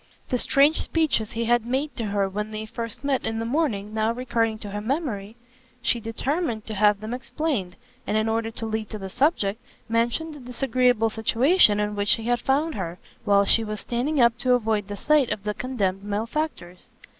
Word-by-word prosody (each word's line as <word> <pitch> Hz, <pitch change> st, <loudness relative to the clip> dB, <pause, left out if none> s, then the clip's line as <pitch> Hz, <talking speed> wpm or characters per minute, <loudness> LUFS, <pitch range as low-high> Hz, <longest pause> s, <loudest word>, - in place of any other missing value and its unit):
The 250 Hz, -, 0 dB
strange 285 Hz, +6 st, +4 dB
speeches 305 Hz, -10 st, 0 dB
he 230 Hz, +1 st, -1 dB
had 240 Hz, 0 st, +3 dB
made 265 Hz, +3 st, -2 dB
to 230 Hz, -, -3 dB
her 200 Hz, -1 st, 0 dB
when 210 Hz, +2 st, -4 dB
they 215 Hz, 0 st, -5 dB
first 230 Hz, +2 st, -4 dB
met 275 Hz, -2 st, 0 dB
in 225 Hz, 0 st, -2 dB
the 225 Hz, -, -2 dB
morning 230 Hz, -7 st, -1 dB
now 220 Hz, +1 st, +1 dB
recurring 230 Hz, -2 st, -1 dB
to 205 Hz, -2 st, -8 dB
her 205 Hz, +1 st, -4 dB
memory, 225 Hz, -5 st, -3 dB, 0.5 s
she 240 Hz, -, +2 dB
determined 230 Hz, +2 st, -2 dB
to 220 Hz, -, -5 dB
have 210 Hz, 0 st, +3 dB
them 215 Hz, +2 st, -5 dB
explained, 250 Hz, -, -2 dB, 0.3 s
and 215 Hz, -, +1 dB
in 215 Hz, +1 st, +1 dB
order 225 Hz, 0 st, 0 dB
to 225 Hz, 0 st, -6 dB
lead 220 Hz, -1 st, -3 dB
to 215 Hz, -, -5 dB
the 195 Hz, -2 st, -7 dB
subject, 225 Hz, -, +1 dB, 0.3 s
mentioned 235 Hz, +8 st, 0 dB
the 295 Hz, -, -10 dB
disagreeable 250 Hz, -2 st, +1 dB
situation 225 Hz, -, +4 dB
in 210 Hz, 0 st, -1 dB
which 205 Hz, 0 st, +3 dB
he 225 Hz, -, -2 dB
had 240 Hz, +1 st, +1 dB
found 295 Hz, +4 st, +1 dB
her, 175 Hz, -5 st, -4 dB, 0.3 s
while 200 Hz, 0 st, +4 dB
she 225 Hz, -, +5 dB
was 215 Hz, -1 st, -4 dB
standing 265 Hz, +5 st, -1 dB
up 235 Hz, -1 st, +5 dB
to 250 Hz, 0 st, +3 dB
avoid 220 Hz, -4 st, 0 dB
the 205 Hz, 0 st, -6 dB
sight 295 Hz, +1 st, +3 dB
of 210 Hz, -2 st, -3 dB
the 210 Hz, 0 st, -1 dB
condemned 200 Hz, -7 st, -2 dB
malefactors. 210 Hz, -, -4 dB
225 Hz, 200 wpm, -25 LUFS, 210-255 Hz, 0.5 s, she